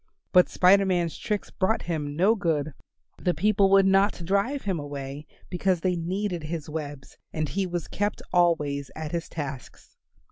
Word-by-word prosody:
But 180 -2 +5
Spider 195 +2 +5
Man's 175 -3 0
tricks 210 -2 -3
brought 205 +3 0
him 150 -4 -3
no 190 +7 +4
good; 160 -8 -1 0.5
the 180 -2 +1
people 200 +3 +3
would 195 0 +6
not 195 -2 +2
drive 200 +10 0
him 190 -5 -1
away 145 0 -6 0.2
because 180 -1 0
they 185 0 +1
needed 180 +1 -2
his 160 -1 -4
webs 145 -3 -7
and 155 -1 -2
he 195 +4 -1
was 175 -2 -4
kept 205 +1 -2
always 150 -6 +2
at 155 -1 -5
his 170 -1 -3
tasks. 140 -5 -7
175 Hz, 165 wpm, -26 LUFS, 150-195 Hz, 0.5 s, would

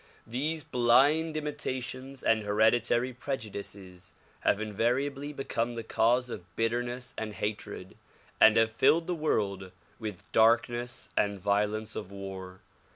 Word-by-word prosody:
These 150 +7 -2
blind 140 +7 +3
imitations 130 -3 -5
and 110 -1 +3
hereditary 110 +4 +2
prejudices 100 -8 -6 0.3
have 100 - +2
invariably 130 +7 -1
become 120 -4 -2
the 115 - -4
cause 120 +3 +2
of 90 -4 -9
bitterness 120 +2 -1
and 110 -1 -5
hatred 105 -3 -5 0.4
and 110 0 +7
have 115 0 +4
filled 145 +9 +4
the 180 - -1
world 100 - -1 0.3
with 105 -5 -6
darkness 120 +2 +2
and 100 -1 +1
violence 105 +3 0
of 95 - -6
war. 95 -2 -8
115 Hz, 120 wpm, -29 LUFS, 105-130 Hz, 0.4 s, and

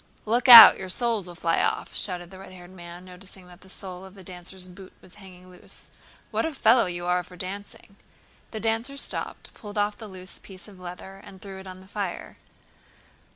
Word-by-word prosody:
"Look 235 +5 0
out, 235 -3 +12
your 190 - -6
soles 225 -2 -1
will 175 - -10
fly 165 -1 0
off!" - - -2
shouted 175 -2 -4
the 190 - -12
red 195 - -11
haired 180 -1 -13
man, 175 0 -11
noticing 185 +1 -13
that 180 0 -16
the 190 - -17
sole 185 -1 -8
of 190 +1 -13
the 190 - -13
dancer's 180 +1 -6
boot 185 +1 -14
was 180 - -18
hanging 185 -1 -15
loose. 180 - -7 0.4
"What - - -1
a 320 -2 -3
fellow 235 -3 +4
you 175 0 -5
are 180 0 +1
for 180 +1 -15
dancing!" 200 +2 -8 0.5
The 220 - -6
dancer 225 +5 -2
stopped, - - -2
pulled 210 -1 -10
off 205 0 0
the 220 - -9
loose 185 -1 -8
piece 190 0 -11
of 195 -3 -15
leather, 180 +2 -10
and 190 - -14
threw 195 0 -10
it 190 - -12
on 185 0 -10
the 190 - -17
fire. 200 -3 -6
190 Hz, 205 wpm, -25 LUFS, 180-205 Hz, 0.5 s, out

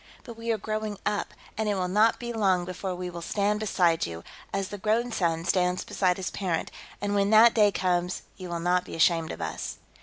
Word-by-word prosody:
But 235 - -9
we 230 +1 -3
are 225 - +1
growing 215 0 -3
up, 210 -1 -1 0.3
and 220 -1 +1
it 205 - +1
will 185 -1 -1
not 210 +5 +3
be 240 -1 -4
long 190 -5 +2
before 185 +1 -4
we 180 0 -5
will 170 0 -7
stand 205 +4 0
beside 175 -6 +2
you, 85 0 -7 0.3
as 195 -1 -2
the 205 - -7
grown 225 +4 +1
son 165 -5 0
stands 180 0 +1
beside 180 -2 +1
his 190 - -3
parent, 180 -5 -2 0.3
and 205 0 -1
when 200 0 +2
that 220 +2 +7
day 210 -2 +5
comes, 180 -1 0
you 185 -2 -8
will 170 -1 -3
not 180 +1 +2
be - - -8
ashamed 165 0 +3
of - - -5
us." 80 - -4
190 Hz, 220 wpm, -27 LUFS, 175-210 Hz, 0.3 s, that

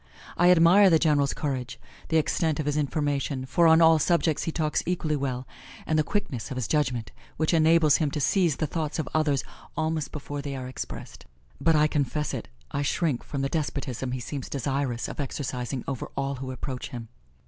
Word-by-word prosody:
I 175 +1 +4
admire 180 +3 +7
the 165 - +6
General's 145 -3 +2
courage, 130 -4 -3 0.3
the 160 - +3
extent 160 0 +1
of 155 - -1
his 145 0 0
information, 145 -2 -1
for 165 +6 +3
on 160 +1 +6
all 160 -1 +6
subjects 165 -1 +2
he 165 - -1
talks 155 -2 0
equally 170 -4 0
well, 130 -3 -3 0.4
and 160 - 0
the 155 - +4
quickness 140 - -3
of 130 - -5
his 125 -4 -2
judgment, 125 -8 0 0.3
which 155 +2 +1
enables 160 -2 +5
him 155 -3 +1
to 150 - -3
seize 170 +1 +2
the 155 - -1
thoughts 155 0 -3
of 160 - -2
others 150 -4 +2 0.3
almost 160 -1 -1
before 145 -1 -5
they 140 -1 -5
are 130 -1 -5
expressed; 130 - -8 0.3
but, 165 - +4
I 150 0 +5
confess 150 0 -1
it, - - -4 0.2
I 140 - -1
shrink 145 -2 0
from 140 -2 -4
the - - +1
despotism 135 -5 -3
he 130 - -2
seems 135 +2 -5
desirous 135 -2 -2
of - - -8
exercising 130 -2 -3
over 135 -4 -4
all 140 0 -1
who 130 0 -6
approach 130 0 -5
him. 120 -4 -7
145 Hz, 195 wpm, -26 LUFS, 135-160 Hz, 0.4 s, admire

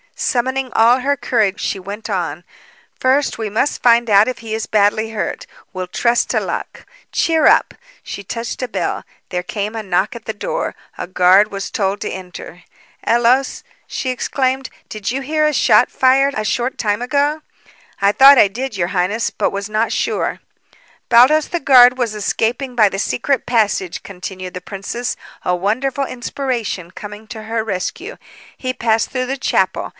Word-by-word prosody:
Summoning 260 +1 -1
all 235 +3 +5
her 280 +2 0
courage, 220 -5 0
she 195 - -2
went 205 +4 -7
on: 180 -4 -3 0.6
"First, 265 0 +1
we 220 -2 -2
must 230 +8 -1
find 235 -1 +4
out 205 +1 +6
if 255 - -3
he 225 -1 -6
is 220 0 -3
badly 215 +1 +2
hurt. 225 - -4 0.3
We'll 185 -1 -4
trust 235 +6 +1
to - - +2
luck. - - -5 0.3
Cheer 320 -2 +2
up!" - - +4 0.3
She 200 - -7
touched 230 +6 -5
a 255 - -1
bell. 235 - -3 0.3
There 180 -1 -2
came 210 +3 -4
a 225 - -3
knock 195 +3 0
at 235 - -10
the 220 - -3
door. - - -3 0.2
A - - -5
guard 185 +3 +4
was 195 -1 -5
told 200 0 -1
to - - -3
enter. 180 -2 -9 0.4
"Ellos," 240 +3 +2 0.2
she 260 - -3
exclaimed, 260 +1 -1 0.2
"did 215 -2 -4
you 265 +3 -2
hear 305 +2 +1
a 300 - 0
shot 250 - +4
fired 270 +2 +3
a 215 - -2
short 245 +4 -1
time 210 0 -1
ago?" 290 +4 0 0.6
"I 200 0 +4
thought 275 +5 +8
I 210 - +7
did, 230 +2 -5
your 175 -1 0
highness, 200 +4 0
but - - -1
was 200 +1 -4
not 215 +2 0
sure." - - -1 0.7
"Baldos, 260 +6 +5
the 345 - -2
guard, 255 -3 +6
was 240 -4 -1
escaping 230 +5 -2
by 215 -4 +5
the 195 - -4
secret 260 +5 -1
passage," 210 -6 0
continued 185 -1 -7
the 180 - -6
princess, 205 +7 -4 0.3
a 180 - +1
wonderful 250 +9 -1
inspiration 240 -8 -4
coming 210 +2 -9
to 220 -1 -8
her 225 0 -2
rescue. 225 - -4 0.4
"He 255 - -3
passed 225 -3 0
through 255 -1 -2
the 270 +2 -2
chapel. 265 - 0
230 Hz, 175 wpm, -18 LUFS, 200-260 Hz, 0.7 s, thought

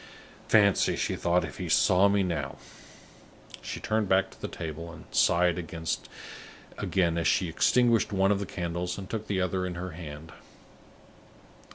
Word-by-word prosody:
"Fancy," 100 -3 +4
she - - -1
thought, 85 0 +1
"if 75 - -10
he 90 -2 -4
saw 100 -1 +5
me 100 -1 +2
now!" 80 -7 -3 1.1
She - - -6
turned 110 -2 -1
back 95 0 +3
to - - -18
the - - -3
table, 85 0 -6
and 85 -1 -12
sighed 85 0 +3
again 85 +1 -4
as 85 - 0
she 90 - +2
extinguished 115 +7 +3
one 95 0 +2
of 100 - +1
the 100 - -4
candles 90 0 -3
and 95 -1 -7
took 110 0 -5
the 100 -2 -1
other 90 0 -1
in 90 -1 -4
her 90 +1 -5
hand. 80 -1 -9
90 Hz, 160 wpm, -28 LUFS, 85-100 Hz, 1.1 s, saw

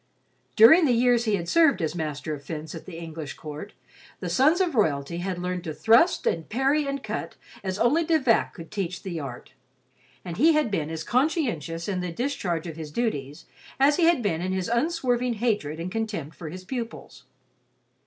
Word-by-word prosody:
During 310 +11 +8
the 250 - +3
years 240 0 +3
he 215 -2 +2
had 170 -3 -4
served 320 - +4
as 160 -3 -1
master 155 -2 -4
of 145 -1 -7
fence 155 +1 -6
at 165 - -9
the 175 -3 -8
English 160 -3 -7
Court, 155 +6 -8 0.5
the - - -4
sons 305 +7 +4
of 360 -4 +1
royalty 160 - 0
had 180 +1 -3
learned 180 0 -3
to 155 -2 -4
thrust 235 - +4
and 165 -2 -1
parry 275 +5 +1
and 275 -1 -3
cut - - -4 0.3
as 190 -1 -3
only 290 +10 +3
De 325 0 +3
Vac 255 -6 +2
could 165 -3 -11
teach 185 -4 -4
the 175 -4 -4
art, 135 -4 -8 0.7
and 175 -2 -5
he 325 +2 +5
had 300 -7 +1
been 160 -6 -1
as 160 0 -4
conscientious 235 - 0
in 190 -3 -1
the 180 -1 -3
discharge 180 - -2
of 165 -2 -7
his 155 -2 -6
duties 150 - -3 0.3
as 285 +2 +4
he 345 - +4
had 330 -7 +3
been 170 -5 0
in 185 +1 -2
his 190 +1 -2
unswerving 250 -2 0
hatred 205 -9 -1
and 175 +2 -4
contempt 205 -9 -4
for 160 - -7
his 185 +3 -8
pupils. 235 0 -6
190 Hz, 195 wpm, -26 LUFS, 165-250 Hz, 0.7 s, During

